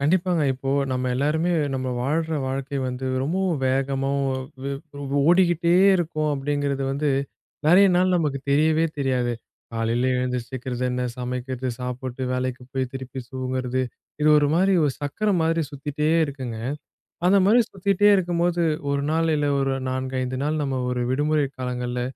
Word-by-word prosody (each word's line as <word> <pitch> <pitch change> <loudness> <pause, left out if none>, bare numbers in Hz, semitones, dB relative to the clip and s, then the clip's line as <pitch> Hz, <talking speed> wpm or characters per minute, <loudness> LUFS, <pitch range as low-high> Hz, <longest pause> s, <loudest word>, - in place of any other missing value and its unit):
கண்டிப்பாங்க. 170 +2 +2
இப்போ, 135 +1 -4 0.2
நம்ம 125 0 -1
எல்லாருமே 155 +6 +1 0.2
நம்ம 130 -1 -2
வாழ்ற 160 +5 0
வாழ்க்கை 135 +1 -3
வந்து, 125 +1 -4 0.2
ரொம்பவும் 175 +2 0
வேகமா 135 +1 0 0.2
ஓ - - 0 0.7
ஓ 145 - -6 0.3
ஓடிக்கிட்டே 175 -2 +4 0.2
இருக்கோம் 155 -3 -1
அப்டிங்கிறது 140 0 -1
வந்து, 145 +1 0 0.6
நிறைய 190 +4 +7
நாள் 185 +1 +3
நமக்குத் 145 -5 -1
தெரியவே 155 +3 +3
தெரியாது. 125 -3 0 0.4
காலையில 115 +3 0
எழுந்து 125 0 -1
சீக்கிரம் 125 -1 -5
என்ன? 125 0 -2 0.2
சமைக்கிறது, 125 +1 -3
சாப்பிட்டு, 125 0 -5
வேலைக்குப் 125 0 -3
போய் 130 -1 -1
திருப்பி 130 0 -6
தூங்கறது. 130 0 -2 0.4
இது 150 - +4
ஒரு 145 -1 +3
மாதிரி 190 +3 +3
ஒரு 145 - +2
சக்கரம் 185 +7 0
மாதிரி 165 +1 +1
சுத்திட்டே 145 +2 -2 0.2
இருக்குங்க. 130 -5 -6 0.7
அந்த 190 +2 +5
மாதிரி 225 +5 +6
சுத்திட்டே 200 +1 +2
இருக்கும்போது, 175 -1 0 0.3
1 140 0 0
நாள் 165 +1 +1
இல்ல 145 -1 0
ஒரு 135 0 +1 0.2
4 130 0 -3
5 130 0 -3
நாள் 155 +1 0
நம்ம 135 -2 -1
ஒரு 125 -1 -1
விடுமுறை 150 +2 +1
காலங்கள்ல, 125 -1 -3
140 Hz, 145 wpm, -24 LUFS, 130-160 Hz, 0.7 s, நிறைய